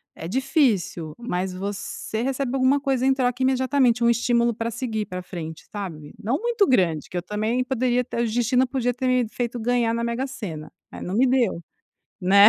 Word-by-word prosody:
é 165 Hz, -, -6 dB
difícil, 215 Hz, -, +1 dB
mas 190 Hz, -6 st, -2 dB
você 200 Hz, +3 st, -4 dB
recebe 270 Hz, 0 st, -1 dB
alguma 265 Hz, +2 st, +4 dB
coisa 265 Hz, -2 st, +1 dB
em 270 Hz, -, +5 dB
troca 250 Hz, -1 st, 0 dB
imediatamente, 260 Hz, -2 st, +3 dB
um 235 Hz, -, +5 dB
estímulo, 235 Hz, 0 st, +2 dB
pra 230 Hz, +1 st, -2 dB
seguir 220 Hz, -3 st, -2 dB
pra 180 Hz, -1 st, -5 dB
frente, 160 Hz, -3 st, -7 dB
sabe, 165 Hz, -8 st, -6 dB
não 240 Hz, +7 st, 0 dB
muito 465 Hz, -4 st, +2 dB
grande, 170 Hz, -, +2 dB
que -, -, -10 dB
eu -, -, 0 dB
também 215 Hz, +6 st, 0 dB
poderia 250 Hz, -1 st, +1 dB
até 240 Hz, -1 st, -3 dB
o -, -, +2 dB
destino 245 Hz, +3 st, +2 dB
podia 245 Hz, -1 st, 0 dB
ter 255 Hz, +2 st, -2 dB
me 250 Hz, -3 st, +2 dB
feito 240 Hz, +1 st, -3 dB
ganhar 235 Hz, 0 st, +1 dB
na 235 Hz, 0 st, -1 dB
Mega-Sena, 235 Hz, -, -4 dB, 0.2 s
é, -, -, -9 dB
não 180 Hz, -, -3 dB
me 255 Hz, +4 st, +4 dB
deu, 245 Hz, -9 st, +2 dB, 0.6 s
né, 200 Hz, +3 st, +8 dB
235 Hz, 190 wpm, -24 LUFS, 200-255 Hz, 0.6 s, né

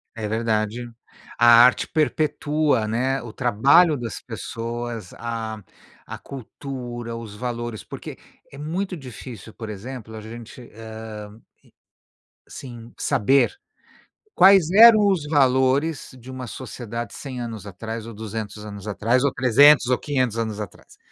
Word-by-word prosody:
É 110 Hz, -2 st, -4 dB
verdade. 110 Hz, +1 st, -1 dB, 0.5 s
A 120 Hz, -, +5 dB, 0.2 s
arte 125 Hz, -, +4 dB
perpetua, 150 Hz, -5 st, +1 dB
né, 130 Hz, +5 st, 0 dB
o 115 Hz, -, -8 dB
trabalho 135 Hz, +7 st, +4 dB
das 115 Hz, -3 st, -6 dB
pessoas, 115 Hz, -3 st, -6 dB
a 110 Hz, -3 st, -5 dB, 0.5 s
a -, -, -5 dB
cultura, 120 Hz, -3 st, -7 dB
os 110 Hz, -3 st, -9 dB
valores, 120 Hz, -1 st, -4 dB
porque -, -, -9 dB, 0.3 s
é 140 Hz, -, -13 dB
muito 180 Hz, +6 st, -3 dB
difícil, 125 Hz, -, -10 dB
por 110 Hz, -1 st, -8 dB
exemplo, 110 Hz, +1 st, -8 dB
a 110 Hz, -, -7 dB
gente, 115 Hz, +2 st, -10 dB
hã, 110 Hz, -1 st, -9 dB, 1.1 s
e -, -, -20 dB
sim, 120 Hz, -2 st, -10 dB
saber 135 Hz, -, +2 dB, 0.8 s
quais 190 Hz, -3 st, +7 dB
eram 215 Hz, +1 st, +8 dB
os 180 Hz, -7 st, +1 dB
valores 135 Hz, +1 st, +2 dB
de 125 Hz, +3 st, -13 dB
uma 130 Hz, -1 st, -6 dB
sociedade 120 Hz, -1 st, -7 dB
100 130 Hz, -3 st, -6 dB
anos 110 Hz, -3 st, -6 dB
atrás 110 Hz, +3 st, -6 dB
ou 115 Hz, -, -8 dB
200 105 Hz, -1 st, -6 dB
anos 100 Hz, -1 st, -9 dB
atrás, 115 Hz, +5 st, +1 dB
ou 140 Hz, -, +1 dB
300 135 Hz, +2 st, +6 dB
ou 125 Hz, -, +2 dB
500 130 Hz, -6 st, -1 dB
anos 110 Hz, -2 st, -2 dB
atrás. 105 Hz, -, -9 dB
120 Hz, 135 wpm, -23 LUFS, 110-135 Hz, 1.1 s, eram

